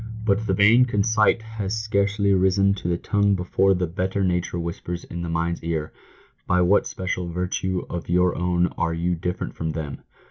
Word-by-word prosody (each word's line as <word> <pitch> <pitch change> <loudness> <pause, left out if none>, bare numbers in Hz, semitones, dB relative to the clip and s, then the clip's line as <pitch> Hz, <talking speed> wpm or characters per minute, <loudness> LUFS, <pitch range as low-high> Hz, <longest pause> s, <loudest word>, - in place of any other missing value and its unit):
But 105 +1 +1
the 95 - +1
vain 110 +6 +6
conceit 110 0 +2
has 110 -2 -4
scarcely 100 -1 +1
risen 95 +1 +3
to 100 - -5
the 85 -1 +1
tongue 100 +1 +1
before 95 +1 +2
the 90 0 0
better 95 +4 -2
nature 90 -1 -1
whispers 85 0 -5
in 85 - -7
the 85 - -4
mind's 85 +1 -2
ear, 80 -2 -3 0.3
" - - -33
By 90 0 +3
what 95 +3 +3
special 90 -1 -3
virtue 90 +1 -2
of 85 -1 -6
your 90 0 +2
own 90 0 +1
are 85 -1 0
you 85 +2 0
different 90 +1 -3
from 80 -1 -3
them 75 -3 -5
90 Hz, 185 wpm, -23 LUFS, 85-100 Hz, 0.3 s, vain